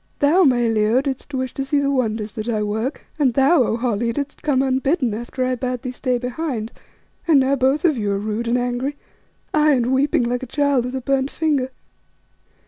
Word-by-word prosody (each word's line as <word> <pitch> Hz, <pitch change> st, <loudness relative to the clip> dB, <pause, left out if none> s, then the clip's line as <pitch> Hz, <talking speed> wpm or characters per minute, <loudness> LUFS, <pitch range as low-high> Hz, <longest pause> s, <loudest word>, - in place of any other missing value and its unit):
Thou, 305 Hz, +6 st, +4 dB
my 240 Hz, -3 st, +3 dB
Leo, 220 Hz, +2 st, +2 dB
didst 270 Hz, +1 st, -4 dB
wish 260 Hz, -2 st, -3 dB
to 270 Hz, -, -3 dB
see 275 Hz, +2 st, 0 dB
the 280 Hz, 0 st, +1 dB
wonders 220 Hz, -5 st, -1 dB
that 220 Hz, 0 st, -5 dB
I 215 Hz, -2 st, 0 dB
work, 220 Hz, +6 st, -3 dB
and 260 Hz, -5 st, +2 dB
thou, 275 Hz, +3 st, +4 dB
O 230 Hz, -1 st, +1 dB
Holly, 235 Hz, -1 st, 0 dB
didst 285 Hz, +3 st, -5 dB
come 270 Hz, -3 st, +1 dB
unbidden 265 Hz, -, +1 dB
after 240 Hz, +3 st, -3 dB
I 255 Hz, -, 0 dB
bade 250 Hz, 0 st, -3 dB
thee 255 Hz, -, -3 dB
stay 250 Hz, 0 st, -1 dB
behind, 250 Hz, -2 st, -4 dB, 0.6 s
and 310 Hz, -4 st, +6 dB
now 270 Hz, +1 st, +2 dB
both 270 Hz, +5 st, +1 dB
of 305 Hz, -8 st, +2 dB
you 205 Hz, -1 st, -1 dB
are -, -, 0 dB
rude 215 Hz, +3 st, -3 dB
and 240 Hz, +1 st, +2 dB
angry, 250 Hz, +3 st, -2 dB, 0.6 s
aye, 305 Hz, -1 st, +4 dB
and 250 Hz, -1 st, +1 dB
weeping 265 Hz, -1 st, +2 dB
like 245 Hz, +1 st, -1 dB
a 260 Hz, -, -6 dB
child 285 Hz, -2 st, +1 dB
with 250 Hz, +1 st, -4 dB
a 260 Hz, -, -3 dB
burnt 270 Hz, +1 st, 0 dB
finger. 290 Hz, -6 st, 0 dB
255 Hz, 210 wpm, -21 LUFS, 235-280 Hz, 0.6 s, and